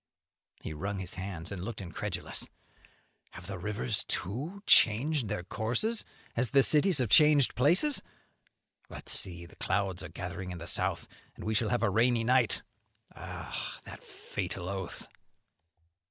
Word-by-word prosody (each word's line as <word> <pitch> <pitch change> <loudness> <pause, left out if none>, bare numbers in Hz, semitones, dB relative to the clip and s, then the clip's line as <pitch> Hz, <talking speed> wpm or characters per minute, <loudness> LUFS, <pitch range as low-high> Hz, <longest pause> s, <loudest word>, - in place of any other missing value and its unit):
He - - -5
wrung 100 +7 -3
his 95 -2 -5
hands 95 -3 -6
and 100 -3 -5
looked 110 +1 -5
incredulous. 90 -4 -4 0.9
"Have 90 - -10
the 95 0 -6
rivers, 105 +1 -2
too, 135 - -3
changed 125 +4 +5
their 100 -3 -3
courses 120 - +1 0.3
as 120 0 +1
the 140 -1 +5
cities 155 +5 +5
have 125 -5 +1
changed 150 +1 +6
places? 175 - +3 0.9
But - - -9
see, 85 -2 -2
the 85 - -16
clouds 95 -2 -1
are 90 - -7
gathering 90 +1 -6
in 90 - -5
the 85 - -7
south, - - -1 0.3
and - - -10
we 110 - 0
shall 110 -1 +1
have 120 -2 +1
a 115 - +4
rainy 115 +2 +3
night. 120 -3 +3 0.5
Ah, - - -6
that - - -10
fatal 90 - -5
oath!" 95 -3 -5
105 Hz, 150 wpm, -31 LUFS, 95-125 Hz, 0.9 s, changed